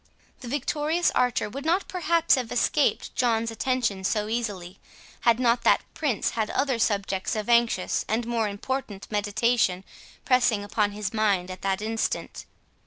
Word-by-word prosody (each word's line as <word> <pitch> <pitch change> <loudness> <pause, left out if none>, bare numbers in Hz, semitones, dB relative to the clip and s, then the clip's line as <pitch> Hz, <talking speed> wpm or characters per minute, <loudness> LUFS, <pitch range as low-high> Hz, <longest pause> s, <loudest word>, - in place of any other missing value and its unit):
The 250 - -9
victorious 295 +5 0
archer 250 -2 +1
would 270 +7 -7
not 345 +5 +1
perhaps 335 -2 +2
have 250 -4 0
escaped 285 +4 +1
John's 230 -2 +1
attention 225 -4 -1
so 210 +2 0
easily, 200 -6 -4 0.4
had 235 0 +3
not 240 -1 +2
that - - +3
Prince 275 -10 -1
had 220 -2 -2
other 265 -3 0
subjects 200 -3 0
of 215 -1 -3
anxious 235 -5 +2
and 225 +2 -1
more 230 -2 0
important 205 0 -4
meditation 210 -2 +1 0.4
pressing 245 -5 +3
upon 205 0 0
his 205 0 -4
mind 200 -4 +1
at 185 - -9
that 195 +1 -1
instant. 225 +1 -3
225 Hz, 150 wpm, -26 LUFS, 205-250 Hz, 0.4 s, had